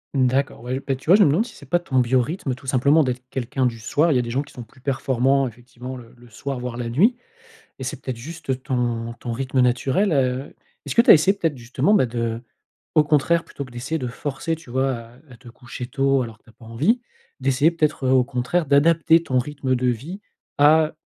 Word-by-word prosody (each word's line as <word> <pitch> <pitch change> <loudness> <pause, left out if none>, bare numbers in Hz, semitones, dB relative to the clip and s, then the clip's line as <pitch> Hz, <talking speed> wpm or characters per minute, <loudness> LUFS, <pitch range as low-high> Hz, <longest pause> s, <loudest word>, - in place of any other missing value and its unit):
D'accord, 130 -1 +1
ouais, 125 +2 -3
j - - -2
bah, 135 - 0
tu 135 +2 -15
vois, 185 - +9
je 205 - +6
me 160 - +4
demande 165 +11 +2
si 240 - -12
c'est 140 - -13
pas 175 +6 +1
ton 145 -6 -3
biorythme, 130 +4 0
tout 130 +2 -12
simplement, 140 +5 +4
d'être 125 -1 -3
quelqu'un 130 +1 -2
du 115 -2 -1
soir. 150 +9 +1
Il - - +2
y - - +3
a - - +2
des 120 - -5
gens 135 +5 -1
qui - - -17
sont 125 - -8
plus 120 +3 -15
performants, 135 0 +1
effectivement, 125 +2 -9
le 115 -2 -13
le 120 0 -18
soir, 135 +4 -5
voire 125 -1 -5
la 120 -1 -3
nuit 190 - +3 0.6
et 130 - -7
c'est 135 +1 -5
peut-être 130 -3 -5
juste 135 -1 -5
ton 120 -3 -2
ton 120 - -5
rythme 130 +2 -2
naturel. 130 +10 +2
Heu, 130 -1 0 0.3
est-ce - - -3
que 235 - +6
tu - - +8
as - - +12
essayé 190 +5 +4
peut-être, 165 -5 -1
justement, 130 - 0
bah 185 -11 +4
de 115 -1 -3 0.5
au 155 - +6
contraire, 150 +3 +2
plutôt 140 - -7
que - - -14
d'essayer 135 +7 -4
de 125 - -3
forcer, 145 +5 -3
tu 160 -6 -14
vois, 130 +1 +1
à 115 0 -12 0.2
à 120 - -14
te 120 -1 -14
coucher 125 0 -8
tôt 135 +1 +1
alors 115 -2 -9
que - - -40
tu - - -20
as - - -19
pas 115 - -17
envie, 150 - +1 0.4
d'essayer 135 +3 +3
peut-être, 155 -4 -1
heu, - - +3
au 130 -1 +5
contraire, 125 +8 -1
d'adapter 160 +3 +4
ton 130 -6 -1
rythme 135 0 -1
de 125 0 -2
vie 140 - -3 0.4
à 155 +2 +5
130 Hz, 240 wpm, -22 LUFS, 125-150 Hz, 0.6 s, as